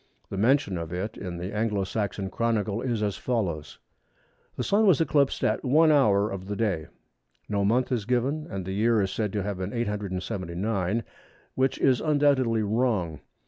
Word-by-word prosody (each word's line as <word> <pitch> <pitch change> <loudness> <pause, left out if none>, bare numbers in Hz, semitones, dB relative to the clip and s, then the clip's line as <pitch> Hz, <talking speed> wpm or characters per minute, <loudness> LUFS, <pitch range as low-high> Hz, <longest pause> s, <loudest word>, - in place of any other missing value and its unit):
The 95 - -3
mention 120 -5 +2
of 85 0 -6
it 95 +5 -3
in 90 -3 -6
the 90 +3 -5
Anglo 105 -2 0
Saxon 100 -1 -3
Chronicle 110 -2 0
is 115 -4 -1
as 100 -2 -1
follows:—"The 85 - -6
Sun 210 +2 +3
was 180 -7 +5
eclipsed 145 -3 +2
at - - +1
1 155 +5 +5
hour 105 -8 +3
of 95 -1 -6
the 105 - -3
day." 100 -8 -1 0.6
No 100 -1 0
month 120 +6 +2
is 115 -5 0
given, 130 +6 0
and 95 -2 -5
the 95 - -4
year 110 +3 +3
is 95 - -2
said 105 -3 -2
to 105 -2 -1
have 100 -1 -4
been 95 +2 -3
879, 100 -1 -2 0.5
which 130 0 +1
is 130 -2 +3
undoubtedly 140 -7 +2
wrong. 105 - 0
105 Hz, 170 wpm, -26 LUFS, 95-125 Hz, 0.6 s, was